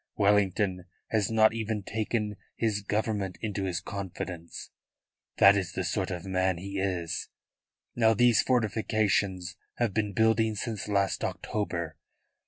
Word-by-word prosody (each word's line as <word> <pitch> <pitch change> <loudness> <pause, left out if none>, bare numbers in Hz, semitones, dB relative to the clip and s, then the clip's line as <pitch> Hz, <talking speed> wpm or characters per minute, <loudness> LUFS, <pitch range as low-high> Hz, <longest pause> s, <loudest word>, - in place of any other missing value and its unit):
Wellington 100 -2 +2 0.3
has 105 -3 +2
not 110 -1 +5
even 110 -2 -2
taken 105 0 -2 0.2
his 110 -3 0
Government 105 -2 -1
into 100 -3 -2
his 90 -3 -1
confidence. 90 -3 -6 0.7
That 100 +1 +8
is 90 -4 -2
the 95 - -2
sort 95 +2 -1
of 90 0 -5
man 95 -1 +1
he 100 +2 -5
is. 90 -4 -2 0.7
Now 115 -1 +4
these 120 -1 +5
fortifications 105 -6 +1 0.2
have 120 -5 0
been 105 -1 0
building 110 +1 +3
since 105 0 -4
last 100 -2 +1
October. 85 -7 -3
100 Hz, 130 wpm, -29 LUFS, 95-110 Hz, 0.7 s, That